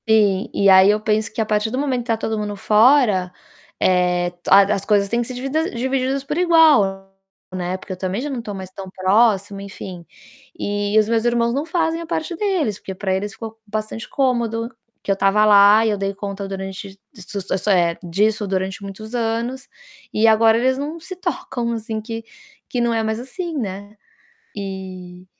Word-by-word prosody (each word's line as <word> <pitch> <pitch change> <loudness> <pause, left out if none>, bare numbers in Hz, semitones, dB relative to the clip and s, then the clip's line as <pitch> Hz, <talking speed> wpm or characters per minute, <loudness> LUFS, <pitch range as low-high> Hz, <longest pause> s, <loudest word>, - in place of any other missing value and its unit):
Sim, 205 -3 +3
e 200 - +2
aí 190 +1 +7
eu 210 +1 +3
penso 215 0 0
que 215 - -8
a 220 - +2
partir 210 +1 0
do 255 - -3
momento 265 -3 0
que 240 - -12
tá 225 -2 +1
todo 220 0 -3
mundo 210 -1 -3
fora, 210 -3 +4 0.5
eh, 180 -1 +2
a 195 +1 +8
as 195 - -2
coisas 200 -1 +2
têm 235 +4 0
que 235 - -4
ser 255 - -6
divida 275 +6 -1
divididas 260 +2 -1
por 295 +3 -4
igual, 265 - +4 0.4
né, 180 0 -3
porque 185 - -8
eu - - -8
também 185 +3 -3
já 280 - -3
não 260 -4 -4
tô 210 -3 -6
mais 190 -1 -8
tão 190 0 -9
próximo, 200 +1 +2
enfim. 190 -3 -8 0.5
E 205 +1 -1
os 215 - +2
meus 225 0 +1
irmãos 235 -1 +1
não 285 +4 -1
fazem 330 -1 0
a 335 - -8
parte 335 +1 -3
deles, 335 - -1
porque 190 - -7
pra 190 0 -2
eles 200 +1 -3
ficou 225 -1 -9
bastante 215 +2 -5
cômodo, 235 -3 -1 0.3
que - - -1
eu - - +2
tava 195 +2 +3
lá 205 +1 +6
e - - +2
eu 210 - 0
dei 195 0 -2
conta 200 0 -5
durante 195 0 -7 0.2
s 200 -1 -8
s 190 +2 -1
eh, 175 -3 +3
disso 210 +4 0
durante 190 0 -2
muitos 215 +3 -8
anos 235 +3 -2 0.5
e 220 +1 +3
agora 225 0 +5
eles 260 +2 +1
não 305 +4 -5
se 370 +3 -8
tocam, 240 -9 -3
assim, 220 -1 -4
que 225 +1 -6 0.5
que 250 - -2
não 235 -1 +1
é 225 -1 0
mais 220 0 -2
assim, 320 +7 -6
né. 205 -3 -5 0.6
E 185 -2 -7
215 Hz, 195 wpm, -20 LUFS, 195-240 Hz, 0.6 s, a